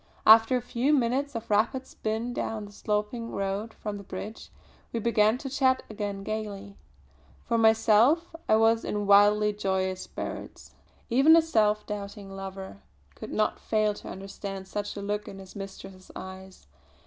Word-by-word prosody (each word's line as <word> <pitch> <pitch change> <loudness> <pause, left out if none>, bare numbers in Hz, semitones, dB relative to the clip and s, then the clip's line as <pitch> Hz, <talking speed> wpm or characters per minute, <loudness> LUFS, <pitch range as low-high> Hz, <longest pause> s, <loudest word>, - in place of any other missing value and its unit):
After 225 +3 +7
a 245 - -5
few 250 +4 +1
minutes 265 +2 0
of 230 0 -5
rapid 230 +6 +2
spin 225 +2 -3
down 220 -3 -3
the 205 - -12
sloping 210 +3 -2
road 200 +3 -3
from 210 -1 -5
the 200 - -9
bridge, 200 +3 -8 0.4
we 230 - -2
began 220 0 +3
to 270 - -7
chat 260 -1 +2
again 200 -2 -4
gaily. 205 -2 -5 0.7
For 235 - 0
myself 225 +9 +4 0.2
I 215 - +6
was 225 +1 +3
in 205 0 -2
wildly 205 +1 +5
joyous 190 -2 -1
spirits. - - -7 0.4
Even 275 +7 +7
a 330 - +7
self 215 -8 +2
doubting 200 -1 -6
lover 190 - -8 0.3
could - - -9
not 215 0 0
fail 215 -1 +1
to - - -11
understand 195 0 -7
such 205 +1 -4
a 200 - -5
look 205 +1 -3
in 195 - -8
his 190 -1 -12
mistress's 195 -1 -9
eyes. 190 - -10
210 Hz, 160 wpm, -27 LUFS, 200-230 Hz, 0.7 s, After